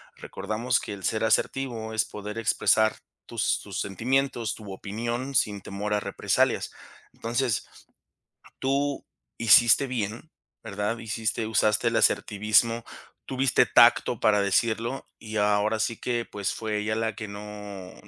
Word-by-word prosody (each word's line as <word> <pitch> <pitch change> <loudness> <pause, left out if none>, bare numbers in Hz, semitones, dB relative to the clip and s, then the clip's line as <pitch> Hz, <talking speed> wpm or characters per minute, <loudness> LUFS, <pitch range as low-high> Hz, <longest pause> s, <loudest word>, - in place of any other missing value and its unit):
recordamos 115 +3 -2
que 105 - -6
el 95 - -10
ser 110 +5 0
asertivo 110 -1 0
es 110 - +1
poder 105 +1 -7
expresar 110 0 +2 0.3
tus - - 0
tus - - -5
sentimientos, 120 +3 -1
tu 105 -3 -10
opinión, 120 +7 -4
sin 105 -4 +2
temor 105 +2 -4
a 105 - +2
represalias, - - 0 0.4
entonces, 120 0 -1 0.9
tú 140 +1 -1 0.3
hiciste 115 +4 +6
bien, 115 +3 -4 0.3
¿verdad?, 105 +1 -3
hiciste 110 0 -2
usaste 110 +1 +2
el 115 - -3
asertivismo, 110 +3 +2 0.4
tuviste 130 -1 +2
tacto 120 -1 +5
para 105 -1 +3
decirlo, 115 +5 0
y 110 0 -6
ahora 105 +1 +2
sí 115 +1 -1
que, 120 -1 -2
pues, 100 -2 -3
fue 110 -1 -3
ella 105 +1 -1
la 110 -1 -1
que 105 0 -6
no 100 -2 -8
110 Hz, 135 wpm, -26 LUFS, 105-120 Hz, 0.9 s, hiciste